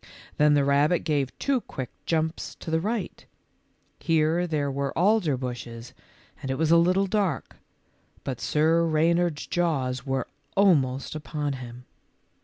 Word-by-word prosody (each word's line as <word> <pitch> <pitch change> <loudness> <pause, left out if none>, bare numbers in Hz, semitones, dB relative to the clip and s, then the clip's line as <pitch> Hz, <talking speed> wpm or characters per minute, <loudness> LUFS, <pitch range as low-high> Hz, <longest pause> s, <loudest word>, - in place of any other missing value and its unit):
Then 150 0 +5
the 140 -1 +3
rabbit 145 +4 +3
gave 140 -4 -1
two 275 -3 0
quick 130 - -7 0.2
jumps 160 0 -1
to 160 - -7
the 160 - +2
right. 220 +3 -3 0.8
Here 165 +2 +2
there 145 -4 -1
were 140 0 -3
alder 180 -6 +3
bushes 120 -2 -6 0.5
and 135 - -5
it 130 - -1
was 160 0 +1
a 170 - +7
little 180 +3 +3
dark, 195 -2 -1 0.7
but 130 -3 -4
Sir 160 +2 +2
Reynard's 165 0 +1
jaws 135 -8 -1
were 135 -1 -2 0.3
almost 140 -10 +2
upon 150 -1 -3
him. 125 -1 -9
155 Hz, 140 wpm, -26 LUFS, 135-170 Hz, 0.8 s, a